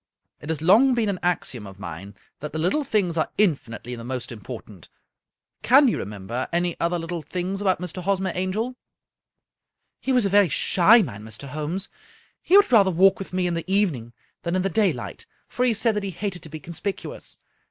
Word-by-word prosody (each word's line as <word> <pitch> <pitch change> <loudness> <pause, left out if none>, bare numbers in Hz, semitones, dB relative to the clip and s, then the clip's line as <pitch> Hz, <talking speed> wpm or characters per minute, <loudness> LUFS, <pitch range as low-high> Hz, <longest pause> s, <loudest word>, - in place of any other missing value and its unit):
" - - -48
It 150 - -9
has 160 -1 -2
long 235 +9 +5
been 225 -3 +1
an 190 -3 -2
axiom 140 - -2
of 95 0 -12
mine 95 +2 -8 0.2
that 150 0 -6
the - - -3
little 180 - +1
things 195 -9 0
are 160 - +1
infinitely 125 - 0
the 115 - -9
most 125 0 -5
important. 110 -5 -10 0.7
Can 275 +3 +6
you 235 - +1
remember 105 +5 -5
any 175 0 0
other 170 +1 +1
little 165 0 -4
things 185 +6 -4
about 190 -2 +1
Mr. 180 0 -5
Hosmer 190 0 0
Angel? 205 +7 -2 0.4
" - - -61
" - - -56
He 265 - -1
was 250 -4 +3
a - - +3
very 200 -2 +5
shy 205 +9 +5
man, 105 - -7
Mr. 110 +5 -8
Holmes. 155 +7 -3 0.5
He 380 - +5
would 405 - +5
rather 205 -5 +6
walk 190 +2 +4
with 195 - -7
me 185 0 0
in 175 - 0
the 170 +2 -4
evening 155 - 0 0.3
than 170 +1 -2
in 185 - +1
the 195 - 0
daylight, 205 +2 -1 0.2
for 250 - -1
he 245 - +3
said 225 +1 +1
that 210 - 0
he 200 - -3
hated 190 -1 -4
to 155 - -10
be 155 +1 -7
conspicuous. 170 +6 -6
180 Hz, 205 wpm, -24 LUFS, 145-200 Hz, 0.7 s, Can